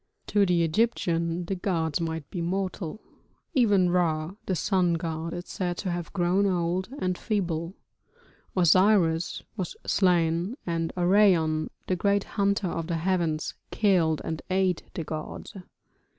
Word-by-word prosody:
To 205 Hz, -2 st, +2 dB
the 175 Hz, -1 st, +3 dB
Egyptian 170 Hz, -3 st, 0 dB
the 195 Hz, -, -2 dB
gods 170 Hz, -4 st, -1 dB
might 160 Hz, -3 st, -3 dB
be 175 Hz, -, -3 dB
mortal; 185 Hz, +1 st, -3 dB, 0.5 s
even 205 Hz, -, +4 dB
Ra, 165 Hz, -1 st, +1 dB
the 185 Hz, -, +1 dB
sun 180 Hz, -2 st, +2 dB
god, 165 Hz, 0 st, -3 dB
is 175 Hz, +1 st, -6 dB
said 175 Hz, -2 st, -3 dB
to 185 Hz, -, -2 dB
have 175 Hz, -1 st, -4 dB
grown 190 Hz, +2 st, +2 dB
old 180 Hz, +1 st, 0 dB
and 185 Hz, -8 st, -1 dB
feeble, 175 Hz, -4 st, -2 dB, 0.8 s
Osiris 180 Hz, -1 st, +3 dB
was 185 Hz, -6 st, -4 dB
slain, 175 Hz, +3 st, +2 dB
and 165 Hz, -1 st, -1 dB
Orion, 175 Hz, -4 st, +3 dB, 0.2 s
the 185 Hz, -, 0 dB
great 200 Hz, +2 st, +2 dB
hunter 200 Hz, -1 st, 0 dB
of 165 Hz, -1 st, -3 dB
the 170 Hz, -2 st, -1 dB
heavens, 165 Hz, -3 st, 0 dB, 0.2 s
killed 175 Hz, -7 st, +2 dB
and 160 Hz, -1 st, -3 dB
ate 185 Hz, -2 st, +1 dB
the 165 Hz, -, -2 dB
gods. 155 Hz, +6 st, -6 dB
175 Hz, 135 wpm, -27 LUFS, 165-190 Hz, 0.8 s, even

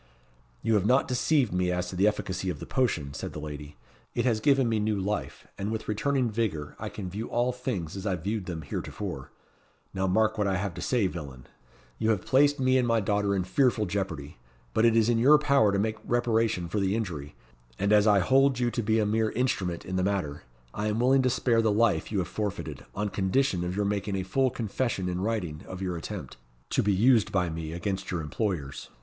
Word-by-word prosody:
"You 115 Hz, -, +2 dB
have 105 Hz, -3 st, +2 dB
not 130 Hz, +3 st, +3 dB
deceived 130 Hz, -, +1 dB
me 90 Hz, 0 st, +1 dB
as 90 Hz, 0 st, -1 dB
to 95 Hz, -, -6 dB
the 95 Hz, +3 st, +3 dB
efficacy 95 Hz, -3 st, -1 dB
of 80 Hz, -5 st, -4 dB
the -, -, -7 dB
potion," 85 Hz, -, 0 dB
said -, -, -6 dB
the -, -, -6 dB
lady; 75 Hz, -1 st, -8 dB, 0.4 s
"it -, -, 0 dB
has 115 Hz, -4 st, +2 dB
given 135 Hz, +1 st, +3 dB
me 110 Hz, -1 st, +1 dB
new 105 Hz, -1 st, 0 dB
life, 100 Hz, +2 st, -3 dB
and 100 Hz, +2 st, -2 dB
with 110 Hz, -1 st, -4 dB
returning 125 Hz, +3 st, 0 dB
vigour 95 Hz, -10 st, -2 dB
I -, -, -4 dB
can 95 Hz, -, -6 dB
view 105 Hz, +5 st, -5 dB
all 120 Hz, +1 st, +1 dB
things 100 Hz, -10 st, -4 dB
as 100 Hz, +2 st, -4 dB
I 95 Hz, -, +1 dB
viewed 100 Hz, +3 st, -3 dB
them 85 Hz, -3 st, -4 dB
heretofore. -, -, -5 dB, 0.6 s
Now 95 Hz, 0 st, 0 dB
mark 110 Hz, +4 st, +2 dB
what 105 Hz, -, +2 dB
I 95 Hz, -1 st, +1 dB
have 95 Hz, -1 st, -2 dB
to 90 Hz, -, -7 dB
say, 120 Hz, -5 st, +1 dB
villain. 70 Hz, -8 st, -6 dB, 0.5 s
You 110 Hz, -, +1 dB
have 105 Hz, -5 st, +1 dB
placed 145 Hz, +2 st, +4 dB
me 130 Hz, 0 st, +3 dB
and 125 Hz, -, +1 dB
my 115 Hz, -1 st, +3 dB
daughter 100 Hz, -1 st, +1 dB
in 95 Hz, -, 0 dB
fearful 110 Hz, +3 st, +2 dB
jeopardy; 85 Hz, -9 st, -4 dB, 0.3 s
but 110 Hz, -, +3 dB
it 115 Hz, -1 st, +4 dB
is 115 Hz, -1 st, +4 dB
in 120 Hz, -1 st, +2 dB
your 145 Hz, +6 st, +7 dB
power 140 Hz, -8 st, +3 dB
to 100 Hz, -, +1 dB
make 110 Hz, +2 st, 0 dB
reparation 115 Hz, -6 st, +1 dB
for 105 Hz, -, -2 dB
the 95 Hz, +1 st, +1 dB
injury; 80 Hz, -10 st, -4 dB, 0.4 s
and 100 Hz, +2 st, +2 dB
as 105 Hz, 0 st, +5 dB
I 100 Hz, -2 st, +5 dB
hold 135 Hz, +5 st, +4 dB
you 120 Hz, -1 st, +1 dB
to 120 Hz, -, -1 dB
be 110 Hz, +1 st, +1 dB
a 110 Hz, -, +2 dB
mere 110 Hz, +1 st, +1 dB
instrument 95 Hz, -9 st, -1 dB
in 95 Hz, +1 st, -3 dB
the 90 Hz, -, +1 dB
matter, 95 Hz, -7 st, -1 dB, 0.3 s
I 105 Hz, +1 st, -2 dB
am 105 Hz, +1 st, 0 dB
willing 130 Hz, +2 st, +4 dB
to 130 Hz, -, +2 dB
spare 120 Hz, -2 st, +2 dB
the 110 Hz, -1 st, +2 dB
life 110 Hz, +1 st, +2 dB
you 105 Hz, -, -1 dB
have 90 Hz, -3 st, 0 dB
forfeited, 100 Hz, -9 st, -4 dB
on 105 Hz, +1 st, -1 dB
condition 95 Hz, 0 st, +1 dB
of 90 Hz, +1 st, -3 dB
your 105 Hz, 0 st, 0 dB
making 100 Hz, 0 st, -1 dB
a 95 Hz, -, -1 dB
full 130 Hz, +8 st, +1 dB
confession 115 Hz, -4 st, -2 dB
in 90 Hz, 0 st, -2 dB
writing 95 Hz, -8 st, -2 dB
of 90 Hz, -, -7 dB
your 90 Hz, -2 st, -2 dB
attempt, 80 Hz, -, -6 dB, 0.3 s
to -, -, +2 dB
be 105 Hz, -, +2 dB
'used 110 Hz, +3 st, +4 dB
by 90 Hz, -3 st, +1 dB
me 80 Hz, -1 st, -5 dB
against 95 Hz, +3 st, -3 dB
your 90 Hz, -3 st, -2 dB
employers. 75 Hz, -3 st, -3 dB
105 Hz, 225 wpm, -28 LUFS, 90-115 Hz, 0.6 s, your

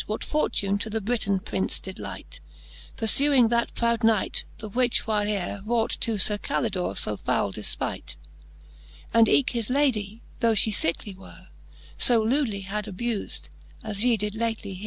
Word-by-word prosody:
What 215 Hz, -, -3 dB
fortune 205 Hz, -9 st, 0 dB
to 220 Hz, -, -3 dB
the 220 Hz, +1 st, -1 dB
Briton 200 Hz, -3 st, -1 dB
Prince 95 Hz, -, -1 dB
did -, -, -9 dB
lite, -, -, -7 dB, 0.6 s
Purfuing 255 Hz, +1 st, +4 dB
that 235 Hz, 0 st, 0 dB
proud 235 Hz, 0 st, 0 dB
Knight, 220 Hz, -3 st, +2 dB
the 215 Hz, -, -7 dB
which 245 Hz, +3 st, +1 dB
whileare 205 Hz, -3 st, -1 dB
Wrought 225 Hz, +1 st, 0 dB
to 225 Hz, -2 st, 0 dB
Sir 205 Hz, +1 st, +3 dB
Calidore 195 Hz, -6 st, -2 dB
fo 105 Hz, -, -1 dB
foule 100 Hz, -, -1 dB
defpight; 75 Hz, -8 st, -4 dB, 1.0 s
And 230 Hz, -1 st, +5 dB
eke 275 Hz, -, +3 dB
his 235 Hz, -2 st, 0 dB
Lady, 230 Hz, -6 st, 0 dB, 0.2 s
though 230 Hz, -1 st, +3 dB
fhe 220 Hz, 0 st, +2 dB
fickely 190 Hz, +2 st, 0 dB
were, 190 Hz, -, -14 dB, 0.5 s
So 240 Hz, -3 st, +6 dB
lewdly 225 Hz, -2 st, 0 dB
had 205 Hz, +2 st, -4 dB
abufde, 210 Hz, -, -3 dB, 0.4 s
as 205 Hz, 0 st, 0 dB
ye 245 Hz, -2 st, +3 dB
did 210 Hz, 0 st, -3 dB
lately 220 Hz, -3 st, -3 dB
heare. 185 Hz, -, -9 dB
215 Hz, 155 wpm, -25 LUFS, 200-235 Hz, 1.0 s, So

